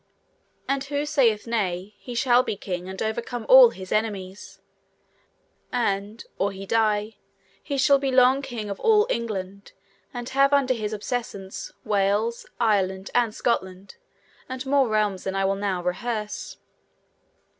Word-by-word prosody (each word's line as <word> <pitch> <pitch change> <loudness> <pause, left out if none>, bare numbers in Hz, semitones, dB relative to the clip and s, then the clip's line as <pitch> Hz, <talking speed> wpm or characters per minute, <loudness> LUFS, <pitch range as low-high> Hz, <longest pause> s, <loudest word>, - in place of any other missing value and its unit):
And 275 0 0
who 285 +1 -2
saith 255 -8 +2
nay, 200 -4 -2
he 245 - -8
shall 245 +1 +4
be 235 - -3
king 180 -2 -5
and 190 - -7
overcome 235 +2 -3
all - - +9
his 185 - -10
enemies; 200 -3 -3 1.1
and, 210 -2 -2
or 195 +1 +1
he 195 0 -8
die, 215 0 +1 0.4
he 280 -2 -4
shall 280 0 +4
be 270 -1 -1
long 260 +1 +5
king 240 -6 -6
of 200 - -6
all 430 -2 +4
England, 200 -4 -4 0.4
and 240 -1 -6
have 275 +1 +3
under 270 -2 +3
his 215 -3 -4
obeissance 205 -3 -5
Wales, 210 +3 0
Ireland, 195 -4 +1
and 240 -2 +2
Scotland, 190 - -2 0.5
and 260 0 -5
more 275 -1 +3
realms 210 -3 0
than 190 - -3
I 195 0 +1
will 195 - +2
now 195 -3 -2
rehearse. 210 +4 -4
220 Hz, 145 wpm, -25 LUFS, 195-255 Hz, 1.1 s, all